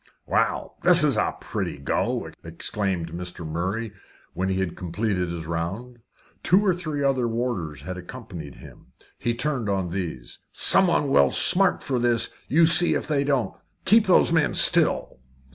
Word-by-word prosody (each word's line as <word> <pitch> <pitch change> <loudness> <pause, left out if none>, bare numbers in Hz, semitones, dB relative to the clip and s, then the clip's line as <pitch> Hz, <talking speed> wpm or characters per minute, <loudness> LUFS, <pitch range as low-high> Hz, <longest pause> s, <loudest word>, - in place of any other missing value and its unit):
"Well, - - -1
this - - +5
is - - +2
a - - -1
pretty - - -4
go!" - - -2
exclaimed 85 0 -3
Mr. 90 0 -7
Murray, 95 +7 -3 0.4
when 95 +1 -2
he 95 0 -1
had 95 -3 -3
completed 90 0 -2
his 85 -1 -6
round. 95 +10 -5 0.4
Two 190 +4 +3
or 185 - +3
three 155 -5 -4
other 130 -3 +1
warders 115 - -4
had 90 +4 -6
accompanied 90 - -10
him. - - -15 0.3
He 120 0 -1
turned 125 -4 -2
on 95 -3 -2
these. 85 -10 -6
"Someone 175 -6 +4
will - - +4
smart 190 +1 +2
for 130 -3 -1
this 120 -1 0 0.2
you 165 +4 +4
see 175 +2 +4
if - - -2
they 145 -2 0
don't. 140 -4 -1 0.3
Keep 215 +2 +4
those 180 - +4
men 165 -3 +1
still." - - +3
115 Hz, 160 wpm, -24 LUFS, 90-145 Hz, 0.4 s, this